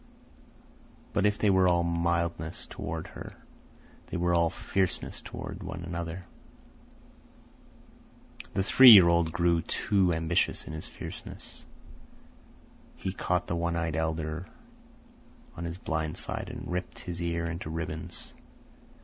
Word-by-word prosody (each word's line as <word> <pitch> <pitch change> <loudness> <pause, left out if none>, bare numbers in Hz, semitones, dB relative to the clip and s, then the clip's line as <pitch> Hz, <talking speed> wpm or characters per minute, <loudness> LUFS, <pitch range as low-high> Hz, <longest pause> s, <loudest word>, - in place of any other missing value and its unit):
But 105 0 +3
if 105 0 +1
they 105 - +3
were 95 -1 +5
all 85 -1 +3
mildness 85 -1 -1
toward - - -5
her, - - -9 0.7
they - - -4
were 85 0 +1
all 85 -1 +4
fierceness 95 +2 -2
toward 100 0 -7
one 95 -2 -6
another. 85 +1 -5 2.3
The 95 - +2
three 130 +5 +9
year 95 -5 +10
old 85 -1 +3
grew 85 -1 +2
too 95 +1 +1
ambitious 80 0 +1
in - - -7
his 80 - -6
fierceness. - - -8 1.3
He 95 - -4
caught 90 -1 0
the 85 - -2
one 85 0 -1
eyed 80 -2 -1
elder 80 +1 -2 1.1
on 85 - -5
his 85 +1 -4
blind 80 -3 -2
side - - -4
and - - -7
ripped 90 +1 -4
his 85 -1 -5
ear 85 0 -1
into 85 -1 -4
ribbons. 80 -1 -5
85 Hz, 130 wpm, -29 LUFS, 80-90 Hz, 2.3 s, year